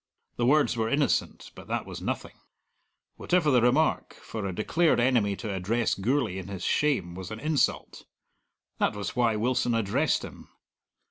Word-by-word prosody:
The 120 - +1
words 145 -1 +3
were 115 -1 -1
innocent, 140 +3 0
but - - -12
that - - -2
was - - -8
nothing; - - -4 0.8
whatever 175 -4 +2
the 125 -2 +4
remark, 135 +7 +1
for 110 -3 -6
a 95 - -5
declared 160 - +2
enemy 120 -5 +2
to 105 0 -5
address 105 +5 0
Gourlay 110 -1 0
in 95 - -8
his 100 -2 -6
shame 125 -13 +1
was 95 0 -7
an 110 - -7
insult: 150 -3 -1 0.7
that - - +1
was 105 -1 -5
why 120 -3 +2
Wilson 120 +1 0
addressed 115 +8 +1
him. - - -12
120 Hz, 160 wpm, -27 LUFS, 100-140 Hz, 0.8 s, the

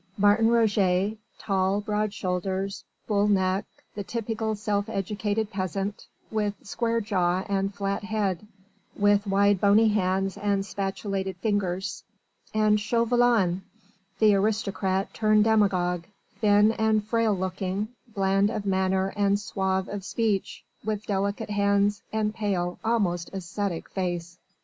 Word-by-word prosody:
Martin 205 +2 +4
Roget, 210 -3 +2 0.2
tall, 195 0 0
broad 210 0 -1
shouldered, 190 +1 -2 0.3
bull 205 -1 +2
necked, 190 -1 0
the 205 - -5
typical 220 0 -2
self 205 0 -1
educated 210 +1 -2
peasant, 195 +1 -3 0.2
with 210 -2 -1
square 230 +2 -1
jaw 185 -4 0
and 195 0 -1
flat 200 0 -2
head, 210 -3 -1 0.5
with 205 0 +3
wide 200 0 +3
bony 210 +2 +5
hands 195 -1 0
and 200 -1 0
spatulated 195 -1 -3
fingers: 190 -1 -2 0.5
and 215 -1 +3
Chauvelin 230 -4 +2 0.6
the 215 -2 +5
aristocrat 195 -2 0
turned 215 -1 +3
demagogue, 185 -6 +2 0.3
thin 210 0 +5
and 220 -1 +1
frail 225 -1 +1
looking, 190 +2 -2 0.2
bland 195 -2 +1
of 215 -2 -4
manner 190 0 +1
and 200 0 +2
suave 190 -2 -1
of 200 -1 -5
speech, 215 -2 -1 0.2
with 215 0 -3
delicate 200 +2 -2
hands 200 0 +2
and 215 -1 0
pale, 185 -5 -2
almost 195 -7 0
ascetic 190 -1 -3
face. 175 -1 -4
200 Hz, 120 wpm, -26 LUFS, 190-215 Hz, 0.6 s, bony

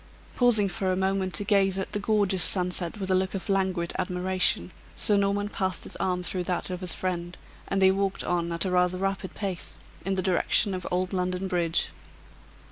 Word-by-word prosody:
Pausing 235 -5 +4
for 190 0 -1
a - - +1
moment 190 0 0
to - - +3
gaze 195 -2 +2
at 190 - -3
the 205 - -2
gorgeous 200 -3 +1
sunset 180 -1 +1
with 190 -2 -3
a - - +4
look 190 +1 0
of 195 - -5
languid 190 -3 0
admiration, 180 - +1 0.3
Sir 210 - +2
Norman 200 +1 +1
passed 190 -3 -2
his - - -8
arm 180 -1 -1
through 180 0 -3
that 180 +1 -2
of 180 - -4
his 180 -3 +2
friend, 175 -1 -3 0.3
and 195 - 0
they 190 0 +6
walked 195 0 -1
on 170 -1 -1
at 170 +1 -2
rather 180 0 +2
a - - -7
rapid 195 -1 -2
pace, 190 -4 -5 0.3
in 195 +2 -1
the 185 - -1
direction 190 +2 +2
of 185 -1 -4
old 180 +1 -1
London 180 0 -1
Bridge. 175 -2 0
185 Hz, 200 wpm, -27 LUFS, 180-195 Hz, 0.3 s, they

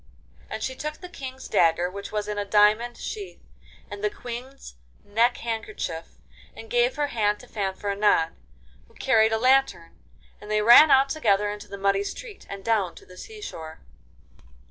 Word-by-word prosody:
Then - - -5
she 260 - -2
took 300 +3 -5
the 360 - -11
King's 265 -6 -8
dagger, 170 +1 +3
which 200 +2 -8
was 210 -1 -2
in 210 -1 -3
a - - 0
diamond 210 +4 +3
sheath, 410 -3 -7 0.5
and 410 - -9
the 420 - +2
Queen's 250 - -9 0.3
neck 230 +4 +2
handkerchief, 215 -7 -5 0.4
and 225 - -11
gave 245 +1 +2
her 290 -1 -1
hand 210 -3 0
to 250 - -15
Fanfaronade, 200 -4 0 0.6
who - - -25
carried 220 -4 +3
a 220 - +2
lantern, 255 -8 +1 0.4
and 210 - -11
they 215 0 +1
ran 240 +8 +9
out 270 0 +5
together 210 -9 +1
into 210 0 -8
the 200 - -8
muddy 200 0 +1
street 435 - -8
and 200 -1 -8
down 210 -7 +1
to - - -14
the 180 - -15
sea 425 - -10
shore. 160 - -8
220 Hz, 170 wpm, -25 LUFS, 200-260 Hz, 0.6 s, ran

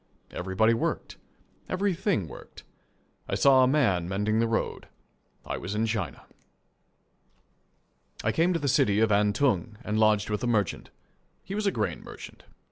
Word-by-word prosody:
Everybody 95 +5 +1
worked. 115 - -3 0.5
Everything 185 - 0
worked. - - -12 0.7
I - - 0
saw 135 -2 +5
a - - +4
man 100 - +2
mending 105 +3 0
the 115 - +2
road. 115 0 -2 0.6
I - - -3
was 95 +4 -5
in 110 +1 +1
China. 105 -4 -3 2.0
I - - +2
came 170 +3 +2
to 175 - +1
the 145 - -2
city 105 -6 +3
of 110 -1 +3
Antung, 105 0 +1
and 105 -1 -1
lodged 105 -1 +3
with 105 - -2
a - - 0
merchant. 105 -6 -1 0.5
He 195 - -7
was 210 0 -1
a - - +3
grain 105 - -2
merchant. - - -11
110 Hz, 150 wpm, -27 LUFS, 100-140 Hz, 2.0 s, saw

